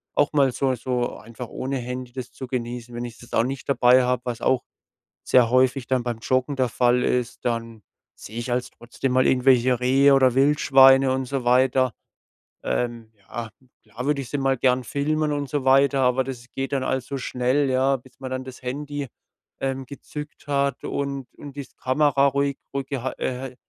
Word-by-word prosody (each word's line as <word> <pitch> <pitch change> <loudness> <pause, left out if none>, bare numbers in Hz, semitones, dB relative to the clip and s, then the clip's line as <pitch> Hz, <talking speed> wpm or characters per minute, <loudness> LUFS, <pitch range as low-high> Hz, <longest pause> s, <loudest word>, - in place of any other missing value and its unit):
auch 145 - +2
mal 140 -3 +4
so 130 +1 0
so 125 0 -2
einfach 115 +3 -9
ohne 135 +1 -3
Handy 125 0 -5
das 130 -1 -7
zu 130 - -8
genießen. 120 -1 -5
Wenn 120 +1 -4
ich 120 -2 -9
das 120 - -14
auch 115 - +3
nicht 135 +2 -5
dabei 130 -1 +5
habe, 125 0 0
was 120 -2 -4
auch 130 -2 +2 0.6
sehr 125 -3 +4
häufig 130 +1 +2
dann 130 -2 +1
beim 120 -2 -3
Joggen 130 +4 0
der 130 -1 +2
Fall 125 0 +2
ist, 125 -1 -1
dann 115 -2 -3 0.3
sehe 110 - -10
ich 120 +1 -3
also 125 0 -1
trotzdem 125 +2 -3
mal 130 0 +3
irgendwelche 125 -1 +3
Rehe 135 +3 +4
oder 130 -2 +4
Wildschweine 135 -1 +5
und 130 0 -2
so 135 0 -3
weiter. 130 0 +3 0.7
Ähm, 120 -2 -2
ja, 110 +3 -7 0.3
klar 125 +3 -7
würde 145 -1 +1
ich 125 - -9
sie 145 - -2
mal 135 -1 +1
gern 130 0 +2
filmen 150 +4 -1
und 145 -1 -2
so 145 0 -2
weiter, 135 +1 +4
aber 130 0 +2
das 125 -2 -7
geht 135 +1 -4
dann 135 -2 0
alles 130 -1 -1
so 140 - -4
schnell, 130 +2 0
ja, 130 +1 +2
bis 130 0 -20
man 130 -1 -6
dann 130 0 -3
das 130 -1 -10
Handy, 145 +2 -4 0.5
ähm, 135 0 -3
gezückt 150 +2 -9
hat 140 -2 0
und 140 -2 -3
und 145 -2 -10
die 140 -2 -6
Kamera 140 +1 +3
ruhig 140 0 0 0.2
ruhig 135 -1 -2
geha 130 -2 -3
äh, 130 0 -4
130 Hz, 195 wpm, -24 LUFS, 125-135 Hz, 0.7 s, dabei